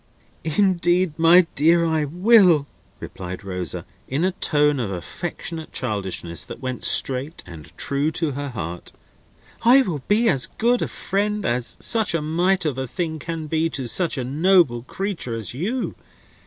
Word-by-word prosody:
"Indeed, 175 0 +2
my 170 +2 +7
dear, 170 +4 +4
I 160 -2 +1
will," 180 -1 +5 0.3
replied 95 +2 -7
Rosa, 90 -2 -4 0.2
in 145 +7 0
a 190 - +2
tone 150 -4 +1
of 115 -5 -2
affectionate 160 - -5
childishness 95 - -3
that - - -9
went 130 -2 -5
straight 135 +5 +1
and 80 -4 -11
true 140 +2 -1
to 160 -2 -1
her 140 +1 -4
heart; 90 -7 -6 0.7
"I 255 +4 +6
will 165 - -3
be 220 +3 +3
as 135 - +2
good 240 +2 +2
a - - 0
friend 205 +1 -1
as 120 0 -1
such 220 -7 +1
a 165 - 0
mite 175 +4 +1
of 140 -4 -1
a 130 - -3
thing 160 +2 -3
can 165 0 -5
be 160 +2 0
to 135 -5 -4
such 165 +6 0
a 130 - -2
noble 150 -2 +3
creature 170 - -4
as 110 -3 -4
you. 215 - -2
155 Hz, 160 wpm, -22 LUFS, 125-180 Hz, 0.7 s, my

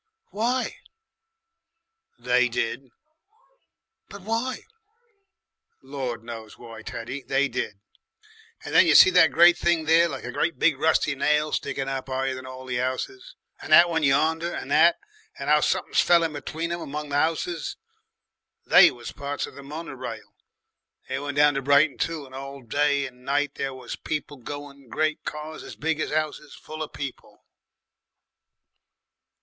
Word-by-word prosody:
"Why?" 240 +5 -1 1.4
"They 125 +1 +2
did." 120 +2 -3 1.2
"But 200 -1 -11
why?" 230 +5 -2 1.2
"Lord 130 -4 -5
knows 115 -2 -9
why, 115 -2 -11
Teddy. 120 +5 -6
They 135 +1 +1
did. 115 -5 -4 0.9
Then - - +5
you - - +5
see 185 - +9
that 180 -3 +5
great 175 +1 +6
thing 170 -2 +1
there 165 +2 +4
like 135 -3 -6
a 120 - -5
great 165 +6 -1
big 150 -5 +2
rusty 155 -1 +2
nail 150 +2 +1
sticking 135 -1 -2
up 135 0 -4
higher 130 0 -1
than 130 0 -8
all 130 0 -9
the 125 -1 -3
houses, 380 - -4 0.3
and - - -9
that 175 0 +8
one 160 -1 0
yonder, 160 +4 +2
and - - -6
that, 170 +2 +5 0.4
and - - -4
how - - +5
something's - - +1
fell 170 -1 +4
in 160 -2 -1
between 160 +3 -4
'em 170 0 -3
among 150 0 -5
the 140 - -3
houses. 165 +2 -1 0.9
They - - +8
was 120 -1 -8
parts 145 0 -4
of - - -12
the 140 - -11
mono 150 +4 -7
rail. 130 -1 -8 0.8
They 130 0 -2
went 145 0 -5
down 145 0 +5
to 135 - -2
Brighton 140 +2 +3
too 165 -3 -2
and 130 - -16
all 135 0 -8
day 145 +3 +1
and 125 -1 -12
night 145 +1 0
there 135 -1 -4
was 125 -2 -7
people 150 -1 -5
going, 140 0 -9
great 155 +3 -1
cars 155 +1 -6
as - - -10
big 160 0 -1
as - - -2
'ouses 150 -1 -3
full 155 0 -9
of 155 - -5
people." 140 -3 -8
145 Hz, 160 wpm, -25 LUFS, 130-160 Hz, 1.4 s, see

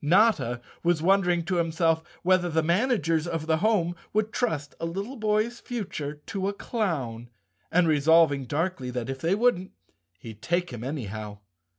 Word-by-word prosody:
Notta 170 - +3 0.2
was 170 -2 +1
wondering 180 -2 +3
to 180 0 0
himself 165 -1 +1 0.2
whether 180 -1 +3
the 160 -1 +1
managers 170 - +1
of 165 -2 -3
the 160 0 +2
home 175 -3 +1 0.2
would 215 +1 0
trust 160 - -1
a 165 - -2
little 200 +10 -4
boy's 220 +1 0
future 170 -11 -5
to 195 -1 -3
a 200 - -1
clown 140 - -3 0.4
and 180 0 +4
resolving 155 -2 +4
darkly 150 -1 -2
that, 125 0 -3
if 135 - -6
they 170 +4 +2
wouldn't, 205 -5 +1 0.4
he'd 110 +3 -11
take 175 -3 -1
him 120 -1 -6
anyhow. 110 -6 -5
170 Hz, 160 wpm, -27 LUFS, 145-195 Hz, 0.4 s, and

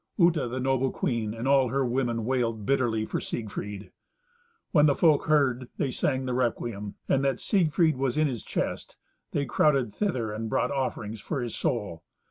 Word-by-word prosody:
Uta, 170 - +3
the 125 +2 -4
noble 135 0 +1
queen 115 -6 -1
and 115 +3 -3
all 135 -2 +4
her 135 +2 0
women 120 -2 -1
wailed 115 -4 -1
bitterly 115 -4 +1
for - - -2
Siegfried. 105 -3 -5 0.8
When 150 -1 +5
the 140 - +3
folk 155 -3 +3
heard 130 -5 +2
they 135 - 0
sang 130 0 -1
the 125 - -2
requiem, 115 -4 -2
and 135 - +2
that 135 -1 +1
Siegfried 165 -5 +2
was 135 +1 -1
in 155 - +4
his 120 -6 -4
chest, - - -3 0.4
they 140 - 0
crowded 135 -9 +2
thither, 130 - -1
and 110 +1 -4
brought - - +1
offerings 115 -6 -3
for 150 - -3
his 120 - -4
soul. 100 -9 -2
130 Hz, 175 wpm, -27 LUFS, 115-140 Hz, 0.8 s, When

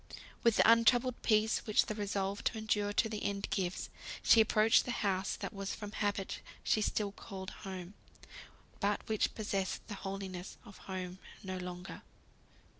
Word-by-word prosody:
With 235 -2 +4
the - - +5
untroubled 230 +2 +5
peace 220 0 +3
which 215 - +4
the - - -3
resolve 200 -1 -2
to - - +1
endure 210 -2 0
to 220 +3 +2
the 215 -1 -4
end 200 0 -1
gives, 185 -3 -2 0.3
she 225 - +7
approached 220 0 +5
the - - -5 0.2
house 190 0 +1
that - - -5
from 205 +1 -4
habit 205 -2 -1 0.2
she 215 - +2
still 210 -1 0
called 190 -1 -8 0.2
home, 185 0 -6 0.9
but 205 0 0
which 215 -1 +1
possessed 195 -3 -2
the - - -4
holiness 195 -2 -5
of 200 -3 -13
home 185 -1 -4 0.2
no 185 -1 -4
longer. 180 +1 -7
205 Hz, 155 wpm, -34 LUFS, 190-215 Hz, 0.9 s, she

